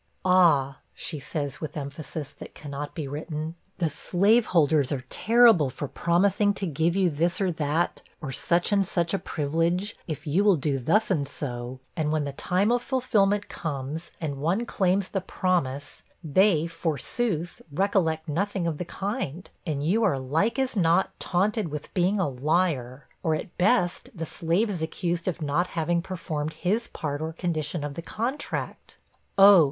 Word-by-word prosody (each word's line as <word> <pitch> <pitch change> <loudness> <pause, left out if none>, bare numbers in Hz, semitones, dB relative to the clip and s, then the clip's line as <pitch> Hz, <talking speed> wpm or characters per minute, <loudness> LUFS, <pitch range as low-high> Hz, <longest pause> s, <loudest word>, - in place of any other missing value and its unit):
'Ah!' 165 -8 +4 0.2
she 155 - -4
says, 145 -1 -4
with 155 0 -5
emphasis 145 +1 -6
that - - -12
cannot 145 0 -6
be 155 -5 -3
written, 155 +2 -4 0.2
'the 165 -4 0
slaveholders 175 - +3
are 130 -3 -3
TERRIBLE 225 - +5
for 140 +3 -5
promising 200 +7 +2
to 195 - -2
give 165 +1 0
you 195 -2 +3
this 170 +3 0
or 190 -3 +1
that, 160 +1 -1 0.2
or 145 -4 -5
such 170 - +1
and 200 -1 +4
such 170 -2 0
a 195 - +1
privilege, 165 +7 -1
if 155 -1 -5
you 165 +7 +2
will 205 -3 +6
do 140 -2 -1
thus 205 - +2
and 145 -6 +1
so; 125 -2 -5 0.2
and 155 -2 0
when 155 -1 +1
the 140 - -3
time 185 +9 +1
of 245 0 +2
fulfilment 210 -6 +1
comes, 155 +1 -5
and 150 -4 -3
one 175 +11 0
claims 190 -3 +1
the 195 - -1
promise, 145 -8 -1 0.2
they, 165 +1 +3
forsooth, 165 - -2
recollect 165 -2 +1
nothing 190 +4 -1
of 160 -3 -2
the 180 - -3
kind: 190 - -4 0.2
and 145 -3 -1
you 215 +8 +2
are, 185 -10 +3
like 160 - 0
as 265 -2 0
not, 175 -1 +3
taunted 200 +2 +1
with 150 -1 -7
being 190 +3 +2
a 185 - +2
LIAR; 140 -2 0 0.2
or, 160 -2 +1
at 170 - -6
best, 180 -2 +2
the 165 - -4
slave 170 +8 0
is 190 -6 -3
accused 170 +2 -2
of 170 -3 -2
not 150 +5 +1
having 170 0 0
performed 160 -4 -4
his 215 +6 0
part 145 -2 -4
or 160 +1 -2
condition 160 -2 -2
of 145 -1 -4
the 170 - -6
contract.' 240 - -4 0.4
'Oh!' 195 -1 +9
170 Hz, 170 wpm, -26 LUFS, 150-195 Hz, 0.4 s, Oh